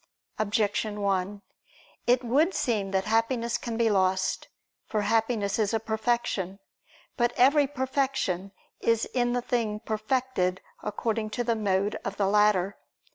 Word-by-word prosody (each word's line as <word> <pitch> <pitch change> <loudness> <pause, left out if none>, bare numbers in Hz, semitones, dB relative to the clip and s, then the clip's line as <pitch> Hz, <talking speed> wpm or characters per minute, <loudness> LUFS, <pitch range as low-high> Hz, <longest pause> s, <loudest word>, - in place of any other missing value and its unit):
Objection 210 0 0
1: 200 +1 -1 0.6
It 250 +1 +4
would 290 +10 +2
seem 210 -5 0
that 190 0 0
Happiness 230 +2 +1
can 230 -2 -4
be 230 -1 +3
lost. 190 -2 +1 0.4
For 215 - 0
Happiness 220 -1 +1
is 215 +1 +1
a - - +1
perfection. 220 -4 -1 0.6
But 240 0 +2
every 280 +3 +5
perfection 260 -9 -1 0.3
is 230 -1 +2
in 245 -1 0
the 245 -1 -1
thing 225 -4 -1
perfected 215 -4 -1 0.2
according 220 +1 -2
to 245 - +1
the 230 -1 +1
mode 200 -1 0
of - - -4
the 200 - +2
latter. 200 -1 +3
220 Hz, 135 wpm, -27 LUFS, 200-240 Hz, 0.6 s, every